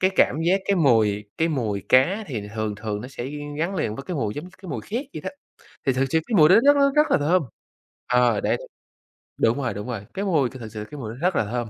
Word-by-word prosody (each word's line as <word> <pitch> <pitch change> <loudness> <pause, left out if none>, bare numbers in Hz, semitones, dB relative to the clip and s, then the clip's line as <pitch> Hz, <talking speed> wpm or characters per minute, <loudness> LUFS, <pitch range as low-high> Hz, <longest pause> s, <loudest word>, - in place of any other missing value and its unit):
Cái 185 +1 +3
cảm 125 - +4
giác 190 +3 +2
cái 200 -1 +1
mùi 110 -9 +3
cái 165 +1 +2
mùi 110 - -2
cá 185 +12 +4
thì 110 -8 -5
thường 110 -1 -2
thường 105 -1 -4
nó 125 - -8
sẽ 125 -2 -6 0.3
gắn 175 +5 -1
liền 110 - -1
với 135 - -6
cái 180 - -3
mùi 110 -7 -2
giống 165 +5 -7
cái 185 - -9
mùi 120 -6 -3
khét 245 +7 -4
vậy - - -5
đó, - - -4 0.6
thì 135 - +4
thực 130 +2 +1
sự 160 - +3
cái 230 - -1
mùi 155 -3 +7
đó - - +7
rất 285 0 +6
rất 280 -1 +4
rất 300 +1 +4
là - - +4
thơm. 165 +4 +2 0.7
Ờ, 125 -3 +3
đấy, - - +1 0.8
đúng 120 +5 +2
rồi, 130 - -1
đúng 105 +4 -6
rồi, 110 -5 -5
cái 200 - -3
mùi 150 -10 +2
thì 130 - -11
thực 115 - -7
sự 105 0 -5
cái 150 - -8
mùi 110 -2 -5
đó - - -11
rất 180 +1 +1
là 110 - +1
thơm. 120 +1 -3
130 Hz, 265 wpm, -24 LUFS, 110-180 Hz, 0.8 s, mùi